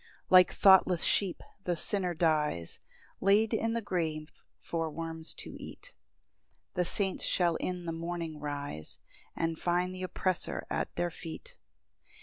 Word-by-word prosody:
4 - - +5
Like 180 - +6
thoughtless 190 -3 +6
sheep 195 -4 +1 0.2
the 175 -2 0
sinner 180 -1 +2
dies, 150 - 0 0.4
Laid 205 +3 +4
in 225 +1 +1
the 230 -1 -2
grave 160 -5 -2 0.3
for 165 -1 -2
worms 160 0 -4
to - - -7
eat; - - -11 0.8
The 180 - +1
saints 190 +2 0
shall 175 -2 +2
in 180 -1 -3
the 165 - -2
morning 165 -1 -4
rise, 145 - -4 0.4
And 165 -1 -1
find 180 +1 0
th' 185 - -5
oppressor 185 0 -1
at - - -2
their 175 0 -1
feet. 485 - -9
175 Hz, 140 wpm, -31 LUFS, 160-185 Hz, 0.8 s, Like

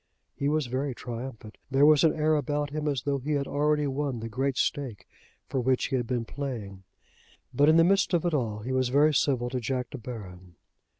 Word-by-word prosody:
He 140 +1 0
was 155 -1 +1
very 130 +2 -2
triumphant. 120 -2 -8
There 135 +2 +4
was 150 -2 +6
an 160 - +5
air 155 0 +1
about 145 -1 -1
him 155 0 -3
as 140 -4 -1
though 140 -1 0
he 150 +4 -2
had 140 -1 0
already 150 +1 +1
won 140 -2 -2
the 115 +1 -5
great 130 +3 -1
stake 120 -10 -2 0.4
for 135 - -2
which 130 +1 +1
he 135 - 0
had 120 -2 -1
been 120 -2 -1
playing. 115 -9 -6 0.7
But 145 +2 +4
in 160 - +6
the 165 - +7
midst 195 +2 +3
of 170 - 0
it 175 - +1
all 110 -7 -1
he 125 +5 -4
was 130 -1 +1
very 145 +4 +4
civil 125 -4 +1
to 130 - -1
Jack 125 +1 -3
De 140 - -6
Baron. 95 -7 -9
135 Hz, 220 wpm, -27 LUFS, 120-145 Hz, 0.7 s, the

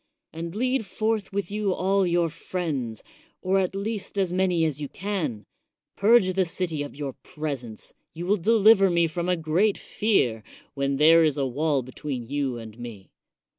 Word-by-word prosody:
And 165 +2 -6
lead 250 -1 0
forth 215 +1 -1
with 200 -1 -3
you 205 -2 0
all 195 0 +2
your 175 -1 +2
friends, 150 -9 -4 0.4
or 190 +1 +2
at 190 0 -1
least 205 0 -4
as 190 -3 +1
many 180 -3 +2
as 150 -2 -2
you 145 - -4
can; 170 - -3 0.5
purge 200 -3 +4
the 190 +1 +2
city 165 -3 -3
of 145 - -6
your 140 -2 -4
presence; 135 -8 -6 0.2
you 170 +2 -6
will 205 +3 +2
deliver 210 0 +5
me 170 -1 +3
from 170 +2 -2
a 180 - +3
great 170 +6 +1
fear, 130 - 0 0.3
when 140 -1 -1
there 165 +3 +6
is 150 -3 +2
a 140 - +1
wall 140 +1 0
between 130 0 -5
you 140 -2 -2
and 115 0 -10
me. 115 -5 -9
170 Hz, 170 wpm, -25 LUFS, 140-195 Hz, 0.5 s, there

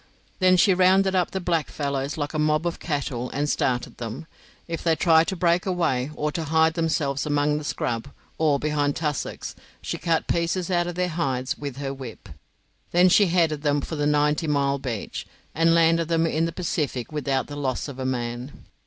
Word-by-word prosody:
Then 185 -1 +5
she 190 +2 +5
rounded 190 +1 +4
up 180 -2 +2
the 190 - -3
blackfellows 145 -5 -2
like 145 0 -3
a 155 - -1
mob 155 +1 +2
of 170 - -2
cattle 135 -5 -3
and 145 +1 -1
started 125 -4 -1
them. 115 +6 -5 0.4
If 165 -1 -4
they 165 -1 +3
tried 160 0 +4
to 190 - -2
break 175 +1 +1
away, 165 -8 0
or 150 0 -1
to 160 +1 -3
hide 160 +1 +3
themselves 155 -4 -1
among 145 0 +1
the - - -7
scrub, 115 -4 -2 0.3
or 155 -3 +3
behind 145 -1 0
tussocks, 150 -3 -3 0.3
she - - -4
cut 165 -2 0
pieces 170 +2 -1
out 175 -1 +2
of 175 - -4
their 180 0 0
hides 135 -3 -1
with 140 -3 -6
her 135 -1 -3
whip. 125 -7 -9 0.6
Then 180 +1 +5
she 200 +2 +5
headed 165 -4 +1
them 145 -1 +1
for 160 - -5
the 145 -1 0
Ninety 150 +2 +2
mile 140 -1 +1
Beach, 120 -6 -5 0.3
and 165 +1 +3
landed 165 0 +3
them 165 0 +2
in 160 0 +1
the 165 - -2
Pacific 155 -8 -2
without 140 -3 -1
the 145 - -8
loss 135 -2 -2
of 135 -2 -8
a - - -2
man. 120 +1 -3
150 Hz, 195 wpm, -24 LUFS, 140-170 Hz, 0.6 s, Then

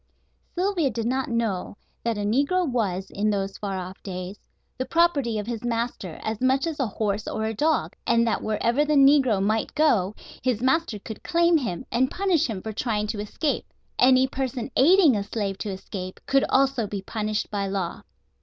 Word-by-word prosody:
Sylvia 360 -5 +1
did 230 -1 -3
not 260 +2 -1
know 225 -5 -2 0.3
that 230 -2 -1
a - - -2
negro 285 - +2
was, 195 -7 -1
in 210 +2 0
those 195 -1 -2
far 195 -2 -3
off 185 +1 -7
days, 185 +1 -6 0.4
the - - +1
property 285 -8 +2
of 210 - -3
his 230 -1 -4
master 230 -7 -3
as 220 0 -3
much 265 +3 +2
as 320 -3 -4
a 265 - +1
horse 210 0 -2
or 220 - -2
a 220 - -1
dog, 310 +8 0
and 235 0 +4
that 225 - 0
wherever 235 +6 +1
the 300 0 +1
negro 275 -6 +5
might 215 +2 0
go 215 -11 +2 0.3
his 250 -4 0
master 260 -1 +1
could 210 +1 -9
claim 340 0 +3
him 180 - -4
and 255 +3 +2
punish 375 -7 +1
him 210 -6 -5
for 220 - -5
trying 210 -2 -1
to 210 0 -4
escape. 245 +8 -2 0.3
Any 255 +1 +6
person 260 -2 -3
aiding 325 - +6
a 205 - 0
slave 200 -2 -3
to 210 - -3
escape 190 -1 -6
could 275 0 +3
also 270 -4 +2
be 200 -1 -5
punished 215 0 -2
by 200 -1 -1
law. 190 -3 -3
230 Hz, 190 wpm, -25 LUFS, 205-270 Hz, 0.4 s, Any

